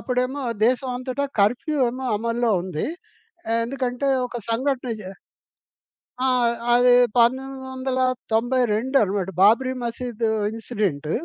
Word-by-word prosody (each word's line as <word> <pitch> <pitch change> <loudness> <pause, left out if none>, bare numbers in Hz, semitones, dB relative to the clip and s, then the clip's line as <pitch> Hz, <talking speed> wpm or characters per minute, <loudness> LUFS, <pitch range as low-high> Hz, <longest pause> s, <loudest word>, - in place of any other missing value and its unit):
అప్పుడేమో 255 +2 -1 0.2
దేశమంతటా 255 +2 -1 0.2
కర్ఫ్యూ 245 +9 +1
ఏమో 255 +1 -5
అమల్లో 230 +2 0
ఉంది 175 -4 -3 0.8
ఎందుకంటే, 255 +1 -2 0.2
ఒక 245 - -7
సంఘటన 255 +2 -1
జ - - -8 1.2
ఆ! - - +3 0.5
అది 245 0 +5 0.3
1992 255 -1 0
అనమాట 195 -1 -2
బాబ్రీ 245 +6 +4
మసీదు 235 -1 -3 0.2
ఇన్సిడెంట్. 205 - -3
245 Hz, 90 wpm, -23 LUFS, 225-260 Hz, 1.2 s, అది